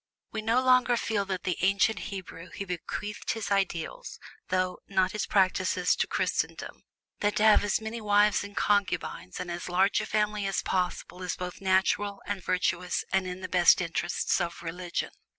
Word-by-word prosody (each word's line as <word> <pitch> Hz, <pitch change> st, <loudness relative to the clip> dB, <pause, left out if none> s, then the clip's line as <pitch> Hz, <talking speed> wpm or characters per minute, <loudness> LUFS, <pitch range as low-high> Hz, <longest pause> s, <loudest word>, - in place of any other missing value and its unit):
We 220 Hz, -, -3 dB
no 230 Hz, +4 st, +2 dB
longer 255 Hz, -1 st, +4 dB
feel 205 Hz, -4 st, -1 dB
with 185 Hz, -2 st, -3 dB
the 180 Hz, -2 st, -2 dB
ancient 195 Hz, +3 st, +3 dB
Hebrew 180 Hz, -3 st, -8 dB
who 200 Hz, -, -6 dB
bequeathed 195 Hz, +3 st, -4 dB
his 220 Hz, -3 st, -5 dB
ideals, 195 Hz, -, -2 dB, 0.3 s
though 185 Hz, 0 st, 0 dB
not 190 Hz, -1 st, +2 dB
his 215 Hz, -, -3 dB
practices, 190 Hz, -2 st, +2 dB
to -, -, +1 dB
Christendom, -, -, -2 dB, 0.4 s
that 205 Hz, 0 st, +1 dB
to 210 Hz, -, +1 dB
have 215 Hz, -1 st, +6 dB
as 205 Hz, -, +1 dB
many 220 Hz, +1 st, -5 dB
wives 205 Hz, -1 st, +3 dB
and 205 Hz, -1 st, -10 dB
concubines 200 Hz, -2 st, 0 dB
and 180 Hz, -1 st, -4 dB
as 175 Hz, +1 st, -5 dB
large 190 Hz, +3 st, +3 dB
a -, -, -5 dB
family 210 Hz, -1 st, 0 dB
as 195 Hz, -, -1 dB
possible 180 Hz, 0 st, -2 dB
is 180 Hz, -, -2 dB
both 180 Hz, +1 st, -6 dB
natural 195 Hz, +1 st, +1 dB
and 200 Hz, -3 st, -4 dB
virtuous 180 Hz, -1 st, 0 dB
and 190 Hz, -1 st, +2 dB
in 180 Hz, +1 st, -6 dB
the 185 Hz, -, -4 dB
best 180 Hz, -1 st, +5 dB
interests 175 Hz, -1 st, 0 dB
of 170 Hz, 0 st, -4 dB
religion. 175 Hz, +1 st, -4 dB
195 Hz, 175 wpm, -28 LUFS, 180-210 Hz, 0.4 s, have